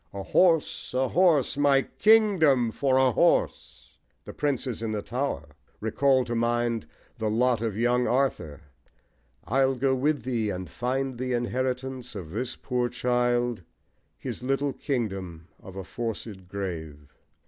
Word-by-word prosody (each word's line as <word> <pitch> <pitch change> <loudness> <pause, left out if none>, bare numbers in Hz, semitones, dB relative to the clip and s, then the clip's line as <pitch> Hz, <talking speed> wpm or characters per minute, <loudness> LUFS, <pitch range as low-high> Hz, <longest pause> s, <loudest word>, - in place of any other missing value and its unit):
A 100 - -4
horse! 165 - +2
A 130 0 +1
horse! 165 -6 +3
My 140 -2 +4
kingdom 180 - +4
for 130 +2 +1
a 130 -1 +4
horse! - - 0 0.3
The - - -8
Princes 135 -5 -2
in 110 -1 -2
the 105 -1 -3
Tower 120 - -3 0.3
recall 130 +4 +2
to 120 - -4
mind 120 -1 0 0.3
the 110 - 0
lot 120 +1 +2
of 110 -3 -2
young 120 +2 +2
Arthur: 90 - -1 0.8
I'll 135 0 +2
go 130 +1 +1
with 140 0 0
thee, 115 -4 -1
And 95 -2 -4
find 125 - -2
the 130 0 -2
inheritance 125 +1 -2
of 85 -6 -7
this 120 +7 -3
poor 125 -2 -1
child, 120 -2 0 0.6
His - - -6
little 135 +2 0
kingdom 95 - -4
of 95 - -11
a 95 - -5
forced 110 -3 -6
grave. 80 -7 -6
125 Hz, 140 wpm, -27 LUFS, 110-135 Hz, 0.8 s, My